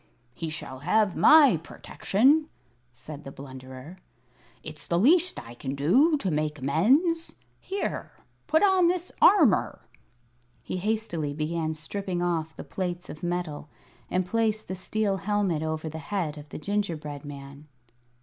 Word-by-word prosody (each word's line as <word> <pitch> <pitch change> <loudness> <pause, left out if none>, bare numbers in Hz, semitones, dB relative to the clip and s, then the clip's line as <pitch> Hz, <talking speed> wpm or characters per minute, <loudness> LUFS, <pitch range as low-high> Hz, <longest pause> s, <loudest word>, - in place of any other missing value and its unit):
"He 160 +5 -5
shall 130 -4 -7
have 195 +6 +2
my 295 - +7
protection," 265 - +1 0.4
said 140 +4 -10
the 135 - -8
Blunderer. 130 +4 -10 0.7
"It's 155 -1 -10
the 170 - +1
least 335 - +3
I 115 0 -10
can 135 +3 -5
do 255 - +4
to 195 -9 -2
make 150 0 -1
amends. 265 - +2 0.2
Here 395 +1 -4 0.3
put 315 +4 +3
on 380 -3 +5
this 360 0 -1
armour!" 285 - +4 0.8
He - - -4
hastily 180 -8 -2
began 160 +1 -2
stripping 185 +3 -4
off 160 -2 -1
the - - -6
plates 180 -1 -4
of 155 - -11
metal, 175 -4 -3 0.4
and 185 0 0
placed 215 +2 0
the 185 - -3
steel 200 +1 -1
helmet 195 -5 0
over 160 0 -3
the 160 +1 -6
head 160 -1 -3
of 150 0 -11
the - - -7
gingerbread 160 -6 -3
man. 140 0 -10
175 Hz, 140 wpm, -27 LUFS, 150-215 Hz, 0.8 s, my